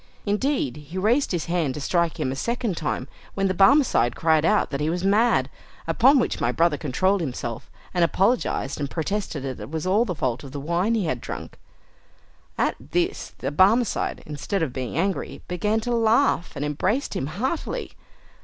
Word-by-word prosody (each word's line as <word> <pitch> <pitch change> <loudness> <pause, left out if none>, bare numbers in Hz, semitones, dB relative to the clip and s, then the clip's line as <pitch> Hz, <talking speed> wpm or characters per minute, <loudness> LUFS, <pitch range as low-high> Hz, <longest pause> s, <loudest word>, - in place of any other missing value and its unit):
Indeed, 210 - 0
he 150 +5 -9
raised 230 +9 +2
his 175 -4 -1
hand 165 -6 0
to - - -4
strike 170 +2 0
him 135 -4 0
a - - -3
second 235 - -2
time, 145 -4 -3 0.3
when 195 0 +1
the 185 - 0
Barmecide 195 - +4
cried 160 -2 +3
out 165 - +2
that 140 - -2
he 150 - +1
was 175 +2 -2
mad, 215 +5 +3 0.4
upon 265 +4 +5
which 250 - 0
my 120 - +2
brother 165 +3 +2
controlled 185 +7 +1
himself, 125 -6 -5 0.2
and 175 -2 +2
apologised 190 - +1
and 140 -1 -2
protested 165 -3 -3
that 135 -2 -5
it - - -7
was 160 +2 -4
all 200 +5 +3
the 185 -7 -3
fault 130 -3 -2
of 135 -1 -10
the 145 - -4
wine 170 +9 0
he 210 -5 0
had 160 - -2
drunk. - - -7 1.0
At - - +1
this 355 +2 -2
the - - -3
Barmecide, 205 +9 +2
instead 155 +5 -2
of 135 -6 -2
being 130 0 -4
angry, 190 +2 -2
began 210 +5 0
to 245 +2 -2
laugh, 230 -4 +2
and 145 - -2
embraced 185 - -1
him 135 - -2
heartily. 255 - -3
175 Hz, 185 wpm, -24 LUFS, 150-220 Hz, 1.0 s, upon